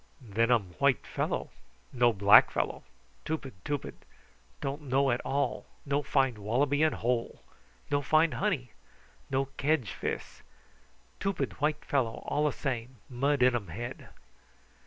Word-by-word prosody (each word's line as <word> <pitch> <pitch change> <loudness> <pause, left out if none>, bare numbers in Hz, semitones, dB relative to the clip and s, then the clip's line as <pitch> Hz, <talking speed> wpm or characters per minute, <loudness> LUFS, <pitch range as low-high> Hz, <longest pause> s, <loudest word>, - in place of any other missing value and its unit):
"Then 115 -2 0
um 105 -8 +2
white 140 -4 +3
fellow. - - -2 0.4
No 120 -1 +4
black 100 0 +7
fellow. - - -2 0.4
Tupid 150 -5 -4
tupid. 145 -2 -3 0.7
Don't 140 +2 -3
know 135 -1 +2
at 120 - 0
all. 140 -1 -1 0.2
No 140 0 +1
find 135 -5 +1
wallaby 130 +8 +1
in 155 -1 +4
hole. 120 0 -2 0.5
No 145 0 +2
find 155 +3 +3
honey. 160 - -1 0.6
No 135 +1 +1
kedge 140 -7 +1
fis. - - -5 0.8
Tupid 195 -5 -2
white 150 0 0
fellow 125 -5 -1
all 150 +1 +1
a - - +1
same, 125 -2 -4
mud 135 +2 +1
in 125 -1 +5
um 105 -5 -3
head." 120 +10 -7
135 Hz, 135 wpm, -30 LUFS, 120-145 Hz, 0.8 s, black